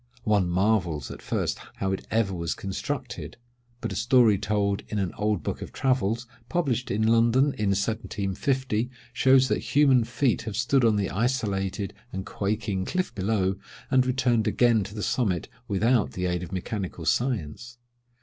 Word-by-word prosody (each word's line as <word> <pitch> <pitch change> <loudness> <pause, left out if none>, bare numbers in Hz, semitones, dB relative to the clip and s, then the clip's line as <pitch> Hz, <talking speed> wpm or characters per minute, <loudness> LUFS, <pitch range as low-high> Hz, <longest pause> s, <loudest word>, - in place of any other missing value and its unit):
One 100 -4 +2
marvels 90 -6 +1
at - - -9
first - - -2 0.2
how 95 -1 -1
it 95 - -4
ever 110 -3 +1
was 85 -2 -2
constructed; 95 -1 -5 0.4
but - - -3
a - - -4
story 115 -6 +4
told 100 0 0
in 105 - -3
an 95 -4 -1
old 105 -2 -1
book - - -3
of - - -7
travels, 125 -3 0 0.2
published 130 -8 0
in 110 +2 +1
London 115 +5 +4
in 105 -2 -1
1750, 110 +4 -1 0.2
shows 130 0 +5
that - - -2
human 135 -4 +6
feet 120 +2 0
have 110 -3 -5
stood 125 +2 +2
on 110 -2 +4
the 100 -2 -1
isolated 100 -4 -1 0.2
and 95 0 -5
quaking 100 -1 -2
cliff 185 - -2
below, 100 -1 0 0.3
and 130 -1 +4
returned 125 -3 +2
again 115 -4 +3
to 105 - -9
the 105 - -4
summit 95 -10 0 0.2
without 110 +2 +2
the 90 - -2
aid 90 -1 -1
of 90 - -7
mechanical 95 -2 -4
science. 120 - -1
105 Hz, 160 wpm, -26 LUFS, 95-125 Hz, 0.4 s, human